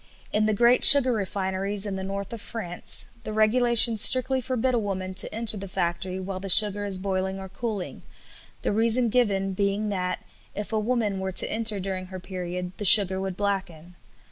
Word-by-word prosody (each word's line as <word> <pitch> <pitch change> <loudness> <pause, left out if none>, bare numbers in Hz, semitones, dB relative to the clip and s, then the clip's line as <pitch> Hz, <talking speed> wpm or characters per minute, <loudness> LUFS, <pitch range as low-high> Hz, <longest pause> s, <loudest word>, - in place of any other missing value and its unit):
In 215 +1 0
the 215 - 0
great 240 +3 +2
sugar 265 -3 +8
refineries 195 0 -3
in 200 -2 -4
the 190 - -6
North 200 +2 -7
of 230 - -9
France 180 -7 -3 0.2
the - - -7
regulations 230 +1 +3
strictly 260 +2 +2
forbid 255 0 -3
a 240 - 0
woman 190 -3 -5
to 190 - +2
enter 220 -1 -2
the 195 0 -7
factory 185 0 -4
while 190 0 -7
the 195 +1 -8
sugar 205 +1 +5
is 195 -2 -1
boiling 190 0 -4
or 190 - -9
cooling, 200 -1 -7 0.6
the - - -2
reason 230 +3 +1
given 200 -5 -1
being 200 +2 -2
that, 180 -2 -5 0.3
if 210 +2 -7
a 220 - 0
woman 215 -3 -2
were 190 0 -5
to - - +2
enter 220 -2 +1
during 185 -1 -6
her 185 0 -9
period, 180 -1 -7
the - - -7
sugar 190 -2 +8
would 190 -1 -6
blacken. 190 -5 -5
200 Hz, 190 wpm, -24 LUFS, 190-220 Hz, 0.6 s, sugar